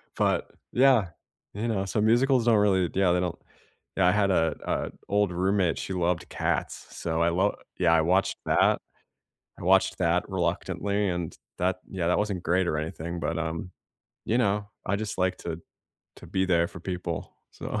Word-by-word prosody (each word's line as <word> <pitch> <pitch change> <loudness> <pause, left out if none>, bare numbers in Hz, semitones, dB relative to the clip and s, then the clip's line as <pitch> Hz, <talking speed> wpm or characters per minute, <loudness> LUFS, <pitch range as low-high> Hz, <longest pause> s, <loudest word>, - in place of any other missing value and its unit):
but - - +1 0.2
yeah. 125 -7 +4 0.4
You 110 +4 -3
know, 100 -3 0
so 105 +2 -1
musicals 120 +3 +3
don't 115 -3 +5
really 95 -4 +3
yeah, 95 -2 +3
they 90 - +2
don't 90 -2 -2 0.6
yeah, 95 -2 +4
I - - +6
had 105 0 +2
a 80 -3 +2
a - - -1 0.2
old 100 -2 +2
roommate, 95 -1 +1
she - - -4
loved 90 -1 0
Cats, - - -2
so 80 0 -2
I 85 - +4
lo 95 +4 +1 0.2
yeah, 85 -2 +4
I 80 - +5
watched 95 +4 +2
that. - - +3 0.8
I - - -8
watched - - +3
that, - - +2
reluctantly, 100 0 -1
and 90 -2 -3 0.2
that 90 +1 0
yeah, 90 -3 -2
that 90 - +3
wasn't 100 -4 -1
great 90 +3 +2
or 75 - 0
anything, 80 +2 -4
but, 85 0 -2
um, 80 +2 -3 0.5
you 115 - +1
know, 105 -2 +1 0.2
I 100 - +1
just 110 0 -4
like 95 0 +1
to 85 -1 -5 0.6
to - - -12
be 95 0 0
there 85 -2 +2
for - - -10
people, 90 -3 -4 0.2
so - - -4
95 Hz, 180 wpm, -27 LUFS, 85-100 Hz, 0.8 s, I